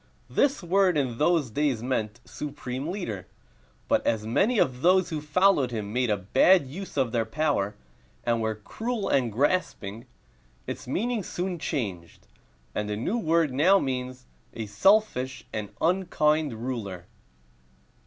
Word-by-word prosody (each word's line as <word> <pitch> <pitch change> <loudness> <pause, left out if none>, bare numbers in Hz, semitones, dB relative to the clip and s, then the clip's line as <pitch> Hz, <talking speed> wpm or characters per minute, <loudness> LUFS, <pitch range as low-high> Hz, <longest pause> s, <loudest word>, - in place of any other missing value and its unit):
This 275 - +2
word 185 -1 +3
in 125 -5 -1
those 155 -6 +2
days 135 -3 0
meant 120 -2 -2
"supreme 135 -1 -5
ruler;" 120 - -4 0.6
but - - +2
as 110 -2 0
many 200 - +2
of 125 -8 +1
those 185 +1 +4
who 155 -2 -2
followed 150 -2 +3
him 105 -3 -4
made 125 -1 +1
a 105 - +2
bad 135 - +4
use 170 +6 -8
of 130 -4 +1
their 115 -1 +1
power, 110 -5 0 0.5
and 115 -1 +1
were 110 0 -1
cruel 220 - -4
and 125 -4 +2
grasping, 115 - -1 0.6
its - - -6
meaning 225 - -1
soon 180 -1 -4
changed, 100 - -4 0.5
and 105 0 -2
the 110 - -2
word 165 - +2
now 180 +9 +5
means 130 -4 -3 0.3
"a 115 - -4
selfish 130 - +2
and 105 -2 -3
unkind 155 -5 +2
ruler." 100 -9 -4
135 Hz, 140 wpm, -27 LUFS, 115-180 Hz, 0.6 s, now